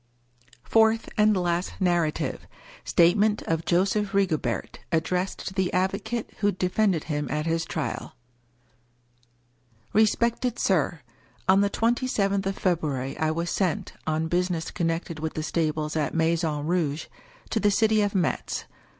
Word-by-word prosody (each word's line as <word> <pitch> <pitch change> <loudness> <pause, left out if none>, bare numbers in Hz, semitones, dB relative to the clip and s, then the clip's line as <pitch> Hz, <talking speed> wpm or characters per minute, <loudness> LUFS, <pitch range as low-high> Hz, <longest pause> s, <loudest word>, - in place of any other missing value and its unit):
FOURTH 225 0 +3
(AND 210 -2 +4
LAST) 175 0 -1
NARRATIVE 175 -4 0 0.4
STATEMENT 205 +5 +3
OF 165 0 -1
JOSEPH 195 +3 +1
RIGOBERT*. 190 -6 0
ADDRESSED 180 +3 -1
TO - - -12
THE 190 -2 0
ADVO 190 +2 +1
CATE 220 +2 -4
WHO 205 0 +3
DEFENDED 185 -1 +1
HIM 150 -2 -2
AT 150 +2 -1
HIS 165 0 0
TRIAL 155 - -4 1.8
Respected 235 +3 +2
Sir, 175 -3 +1 0.2
— 120 -1 -32
On 195 +1 +5
the 200 - +2
twenty 240 +4 +1
seventh 200 -4 0
of 195 - -2
February 150 -7 -1
I 155 - +2
was 170 +2 -2
sent, 185 -5 -1
on 160 +1 0
business 175 -1 -1
connected 165 -1 -2
with 160 0 -4
the 155 - -2
stables 155 -1 -1
at 155 0 -1
Maison 160 -2 +1
Rouge, 160 -3 0 0.5
to 225 - +1
the 210 - +3
city 215 +1 +3
of 205 0 0
Metz. 175 -5 -1
180 Hz, 140 wpm, -26 LUFS, 160-200 Hz, 1.8 s, On